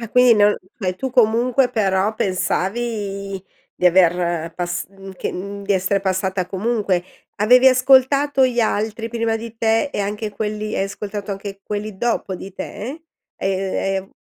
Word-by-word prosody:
Ah, 230 - -6
quindi 250 +1 +6
non 210 -1 +4 0.2
cioè, 185 -4 -1
tu 260 +7 -4
comunque 245 +2 +3
però 200 -2 +1
pensavi 195 0 -2 0.3
di 180 - +1
aver 175 -2 +2
pas 175 0 -3
mhmm, 195 0 -11
che - - -3
mhmm, 200 +2 -6
di 205 - +1
essere 190 +1 +1
passata 190 -1 -1
comunque. 200 -2 0 0.4
Avevi 250 +5 +6
ascoltato 265 +1 +4
gli 245 -1 0
altri 220 +1 -1
prima 230 -1 -1
di 230 0 -8
te 225 +5 +1
e - - -2
anche 210 +2 -3
quelli 215 0 -3
hai 195 - +1
ascoltato 200 0 -6
anche 195 0 -7
quelli 210 0 -5
dopo 225 -3 -1
di 190 +2 -8
te? 245 - -7 0.3
Ehm, 195 0 -2 0.3
ehm - - -28
205 Hz, 155 wpm, -20 LUFS, 190-230 Hz, 0.4 s, quindi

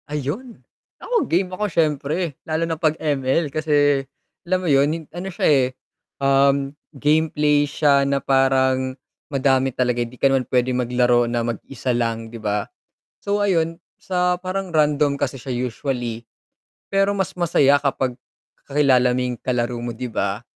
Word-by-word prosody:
Ayun, 150 - -4 0.4
ako 485 -2 -1
game 180 +2 +1
ako 210 +3 -2
siyempre 155 -3 0 0.3
lalo 160 +1 0
na 165 -1 -3
'pag 155 -1 +1
ML, 145 0 0
kasi 145 -3 +2 0.4
alam 185 +1 +2
mo - - -1
'yun 140 0 +4
hin 160 +1 -3
ano 180 +3 -5
siya 180 - 0
eh, 135 -4 +4 0.5
um, 140 0 +2 0.2
gameplay 150 0 +2
siya 140 -1 +3
na 140 - +2
parang 130 -1 +2 0.3
madami 135 -1 +2
talaga, 125 -1 0
hindi 120 +1 -5
ka - - +4
naman 135 -1 +2
pwedeng 125 0 +1
maglaro 120 0 +3
na 120 -1 -1
mag-isa 125 +2 -3
lang, 115 -1 -2
'di 115 - -8
ba? 105 -1 -1 0.6
So, 200 +1 0
ayun 165 -4 +1 0.2
sa 180 -1 0
parang 185 0 -4
random 150 -2 +2
kasi - - -1
siya 130 +1 -5
usually, 120 -1 -3 0.7
pero 195 0 +2
mas 190 -3 -2
masaya 145 -5 +4
kapag 135 -3 -1 0.5
kakilala 135 -3 +3
mo 125 - 0
yung 125 -1 -3
kalaro 120 -1 -1
mo 120 0 -4
'di 125 +2 -5
ba? 100 0 -2
140 Hz, 155 wpm, -21 LUFS, 125-155 Hz, 0.7 s, yun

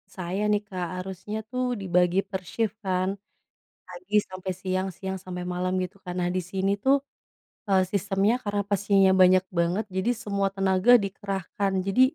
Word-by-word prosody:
saya 185 +2 -3
nih 210 0 +2
Kak, 180 -2 -3
harusnya 190 +3 -6
tuh 255 0 -2 0.2
dibagi 180 0 +2
per 190 -2 -3
shift 220 -2 -1
kan? 185 0 +1 0.8
Pagi 185 +3 -6
sampe 185 0 -6
siang, 185 0 -1
siang 190 0 -4
sampe 180 -1 -6
malam, 185 +1 -1
gitu 180 +2 -7
kan. 180 - -4
Nah, 175 - +1
di 185 - +1
sini 195 0 +1
tuh, 270 +1 +5 0.7
eee, 190 -1 +4
sistemnya 200 +3 +2
karena 205 -1 0
pasiennya 195 -1 +4
banyak 185 0 +6
banget, 175 +6 +1
jadi 190 +6 +1
semua 200 -1 0
tenaga 195 +4 +4
dikerahkan. 195 0 -3
Jadi, 195 +6 +1
190 Hz, 160 wpm, -26 LUFS, 185-200 Hz, 0.8 s, banyak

